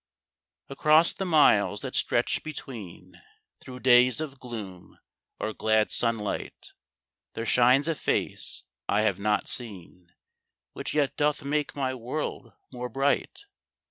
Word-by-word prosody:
Across 155 +4 +3
the 195 - -4
miles 105 -11 +4
that - - -6
stretch - - +1
between, 125 - -9 0.4
Through 125 -1 -11
days 125 0 +5
of 140 -4 -6
gloom 105 -8 -9 0.4
or 110 - -3
glad 110 0 +1
sunlight, 115 -3 -2 0.6
There 115 - -4
shines 125 +5 +4
a 165 - +1
face 150 - -2 0.3
I 105 - +3
have 100 -3 0
not 105 +1 0
seen 90 -6 -3 0.6
Which - - -5
yet 145 -3 +1
doth 150 -1 0
make 150 +1 -2
my 130 -2 -1
world 125 0 -5 0.2
more 125 0 -5
bright. 140 - -1
125 Hz, 125 wpm, -27 LUFS, 110-145 Hz, 0.6 s, days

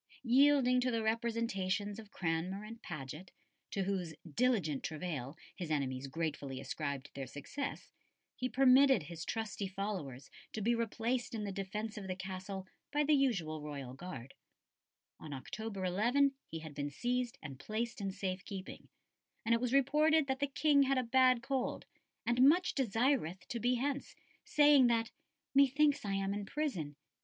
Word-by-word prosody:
Yielding 255 0 +5
to 250 - +1
the 230 -2 0
representations 220 -3 -1
of 215 -2 -11
Cranmer 180 +3 -2
and 225 +2 -9
Paget, 155 +3 -7 0.4
to 195 - -1
whose 185 -4 -2 0.2
"diligent 210 - +2
travail" 155 -3 -4 0.2
his 175 -5 -5
enemies 135 -3 -1
gratefully 145 -3 -3
ascribed 140 0 -4
their 135 -1 -5
success, 145 - -5 0.4
he 255 - -2
permitted 265 - +6
his 165 +1 -7
trusty 215 -2 -3
followers 185 -10 -5 0.2
to 220 - -3
be 235 +3 +3
replaced 235 +1 -1
in 215 - -3
the 200 - -3
defence 205 +3 -4
of 195 - -7
the 185 - -2
Castle 190 +1 -6 0.3
by 295 +1 +2
the 300 +1 +3
usual 195 - +1
royal 140 -4 -6
guard; 135 -5 -8 0.9
on 150 -2 -7
October 195 +8 -5
11 240 +10 +3 0.2
he 165 - -5
had 155 -2 -8
been 145 0 -3
seized 245 - -1
and 135 -4 -7
placed 225 +3 -3
in 195 - -1
safe 190 -1 -3
keeping, 190 -2 -8 0.6
and 230 - +3
it 230 - +2
was 250 -1 0
reported 300 +3 +4
that 265 -1 -1
the 285 - +1
King 285 +1 +4
had 275 0 +3
a 255 - +2
bad 255 0 +4
cold, 270 -2 -2 0.4
and 240 +1 +2
"much 355 +4 +3
desireth 230 - +1
to 235 - -2
be 245 +2 +2
hence, 275 +3 -2 0.3
saying 290 -3 +6
that 230 -1 +1 0.4
'Methinks 280 +1 +4
I 200 -2 -2
am 195 0 0
in 205 -1 -4
prison. 185 - -2
210 Hz, 160 wpm, -34 LUFS, 165-255 Hz, 0.9 s, permitted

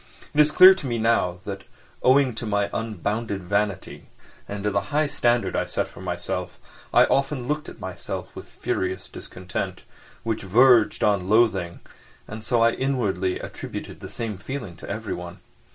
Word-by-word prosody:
It 150 - 0
is 150 - +4
clear 185 +4 +9
to 190 -8 -6
me 120 -2 -1
now 100 -6 +1
that, 95 -1 -5 0.4
owing 130 0 +4
to 115 +1 -5
my 100 -1 0
unbounded 105 -1 -3
vanity 100 +1 -2 0.4
and 100 -1 -5
to 105 - +1
the 100 - +1
high 150 +1 +2
standard 120 -4 +1
I - - +1
set - - -2
for - - -13
myself, - - -4 0.3
I - - +6
often 135 -2 0
looked 150 +1 -2
at - - -13
myself 95 -2 -6
with - - -9
furious 95 0 -3
discontent, 90 0 -6 0.4
which 115 -1 -2
verged 115 +4 +4
on 100 -3 +2
loathing, 110 -6 +2 0.5
and 110 +1 -7
so 120 +1 +1
I 115 - +5
inwardly 105 -9 -1
attributed - - -7
the - - -8
same 110 -4 -4
feeling 110 -8 -6
to - - -10
everyone. 95 -5 -5
110 Hz, 165 wpm, -24 LUFS, 95-125 Hz, 0.5 s, clear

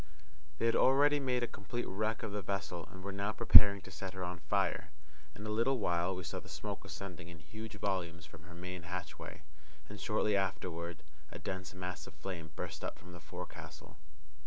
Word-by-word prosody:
They - - 0
had 115 - +4
already 145 +2 +6
made 125 -3 +1
a - - +1
complete 120 +4 -4
wreck 110 +3 -1
of 110 - -2
the 105 0 -2
vessel, 90 -4 -3
and 95 0 -10
were 100 - -3
now 100 +2 0
preparing 105 -3 +9
to 95 - -11
set 95 +1 -5
her 95 - -3
on 90 0 -3
fire. 80 +2 +1 0.5
In 105 - -7
a - - -3
little 115 +5 +3
while 90 -3 +1
we 90 - -4
saw 75 - -3
the - - -13
smoke - - -4
ascending 90 -3 -7
in 85 -1 -9
huge 110 +8 -8
volumes 90 -4 -1
from 80 +1 -13
her 85 0 -11
main 90 +1 -5
hatchway, 85 -2 -6 0.4
and, 105 0 -8
shortly 105 -2 +2
afterward, 85 -3 -1 0.3
a - - -6
dense 95 -1 -4
mass 90 -1 -4
of - - -11
flame 85 0 -5
burst - - -5
up - - -3
from 90 +2 -12
the 85 - -9
forecastle. 90 +3 -8
95 Hz, 200 wpm, -35 LUFS, 85-105 Hz, 0.5 s, preparing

